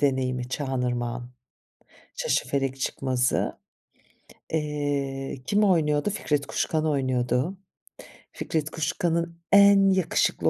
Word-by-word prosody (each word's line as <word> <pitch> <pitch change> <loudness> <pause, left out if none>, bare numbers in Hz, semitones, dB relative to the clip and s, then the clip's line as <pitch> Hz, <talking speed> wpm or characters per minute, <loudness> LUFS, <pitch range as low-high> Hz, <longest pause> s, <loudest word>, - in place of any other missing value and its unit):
deneyimi 130 -3 0
Çağan 130 -2 -2
Irmak'ın. 120 0 -3 0.9
Şaşıfelek 135 - -1
Çıkmazı. 130 -2 0 1.0
Eee, 140 -3 -2
kim 205 +1 +2
oynuyordu? 155 -4 +2
Fikret 150 -8 -1
Kuşkan 155 +2 -1
oynuyordu. 130 +3 0 0.7
Fikret 155 -1 -2
Kuşkan'ın 170 +1 -2
en 200 -1 +7
yakışıklı 185 -3 +1
145 Hz, 85 wpm, -26 LUFS, 130-170 Hz, 1.0 s, en